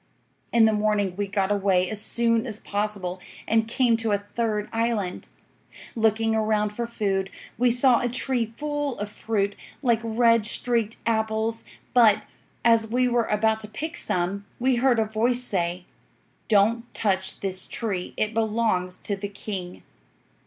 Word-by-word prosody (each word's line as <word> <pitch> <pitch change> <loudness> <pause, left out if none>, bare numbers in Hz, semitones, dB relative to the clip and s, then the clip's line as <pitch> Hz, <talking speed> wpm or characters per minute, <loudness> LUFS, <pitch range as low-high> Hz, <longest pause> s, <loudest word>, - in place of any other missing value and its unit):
"'In 230 -1 +5
the 220 - +3
morning 210 -3 +1
we 205 +1 -2
got 195 0 0
away 190 -3 +2
as 210 +2 -2
soon 230 +2 +1
as 215 -2 -4
possible, 200 -4 -2 0.3
and 225 0 +2
came 240 0 +2
to 225 -2 -1
a - - +3 0.2
third 215 -3 -1
island. 225 -5 -1 0.7
Looking 225 0 +2
around 215 -1 +1
for 235 +3 -4
food, 195 -4 -1 0.3
we 245 +2 +3
saw 245 +1 +5
a 245 - -1
tree 245 -2 -1
full 290 -2 -2
of 205 0 -4
fruit 200 -3 -1 0.3
like 235 -3 +3
red 230 0 +3
streaked 230 -2 0
apples; 220 0 0 0.3
but, 215 -4 +5 0.4
as 230 -1 +4
we 250 +3 +1
were 240 -1 +2
about 220 +1 +1
to 215 - -5
pick 310 +11 -5
some, 190 - -2
we 255 0 +2
heard 250 0 +3
a 220 - +2
voice 235 +3 0
say, 180 -5 -2 0.6
"Don't 225 +3 +2
touch 190 -3 0
this 185 -1 0
tree; 195 -6 -3
it 215 +1 0
belongs 215 -5 0
to 200 - -1
the 200 +1 -5
king." 195 -3 -7
220 Hz, 155 wpm, -25 LUFS, 205-235 Hz, 0.7 s, In